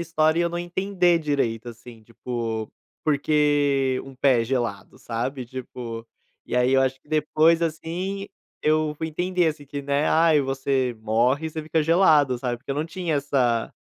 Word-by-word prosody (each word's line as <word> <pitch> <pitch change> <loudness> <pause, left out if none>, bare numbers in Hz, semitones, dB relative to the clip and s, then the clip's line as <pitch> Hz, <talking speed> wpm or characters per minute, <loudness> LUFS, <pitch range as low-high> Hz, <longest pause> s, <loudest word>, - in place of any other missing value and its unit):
história 160 -1 +1
e - - +3
eu 170 - +1
não 175 0 -4
entender 180 0 +1
direito, 135 -7 -1
assim, 115 -1 -12
tipo, 115 -1 -5 0.3
porque 145 -3 +2
um 135 - -11
pé 130 -2 +3
gelado, 115 -5 -3
sabe, 125 +3 -4
tipo, 120 -2 -7 0.4
e - - -2
aí 125 +1 +3
eu 135 - +5
acho 130 0 0
que - - -34
depois, 155 +2 +3
assim, 175 +5 -3 0.4
eu 155 0 +2
fui 160 +1 -3
entender, 180 +2 0
assim, 150 -2 -6
que, 140 +1 -6
né, 140 +1 0
"Ai, 160 -2 +4
você 135 -2 -1
morre, 125 +8 +1
você 155 0 -5
fica 160 +1 0
gelado", 150 -6 +4
sabe, 120 -1 -2
porque 130 +4 -10
eu - - 0
não 150 +2 -2
tinha 165 -2 -2
essa 130 -5 0
145 Hz, 170 wpm, -24 LUFS, 125-160 Hz, 0.4 s, eu